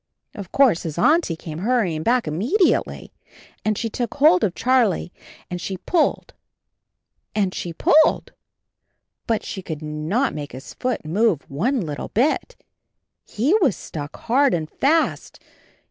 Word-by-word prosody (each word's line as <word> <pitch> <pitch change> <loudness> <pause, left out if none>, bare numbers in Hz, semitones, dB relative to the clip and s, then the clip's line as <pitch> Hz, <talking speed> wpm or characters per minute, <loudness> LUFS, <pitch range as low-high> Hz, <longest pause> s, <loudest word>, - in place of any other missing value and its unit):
Of 195 -3 -9
course 255 -11 +4
his 160 -2 -6
Auntie 305 - +3
came 160 -1 -8
hurrying 195 -7 0
back 240 +2 +1
immediately, 240 - 0 0.5
and 215 -1 0
she 230 - -2
took 235 +1 -4
hold 315 +5 +5
of 180 - 0
Charlie 240 -8 +1 0.3
and 180 0 -5
she 190 +3 -4
pulled 325 - 0 1.0
and 195 -3 +1
she 175 - -4
pulled, 305 - +3 0.9
but 225 -2 0
she 190 - -5
could 160 -4 -6
not 155 - -1
make 145 -1 -7
his 130 +2 -9
foot 255 -9 -3
move 175 -2 +1
one 230 - 0
little 150 -5 -5
bit 300 - 0 0.4
— - - -58
he 260 - +2
was 275 - +2
stuck 145 -2 -7
hard 270 +1 +2
and 160 -2 -3
fast. 315 +4 0
210 Hz, 145 wpm, -22 LUFS, 165-260 Hz, 1.0 s, hold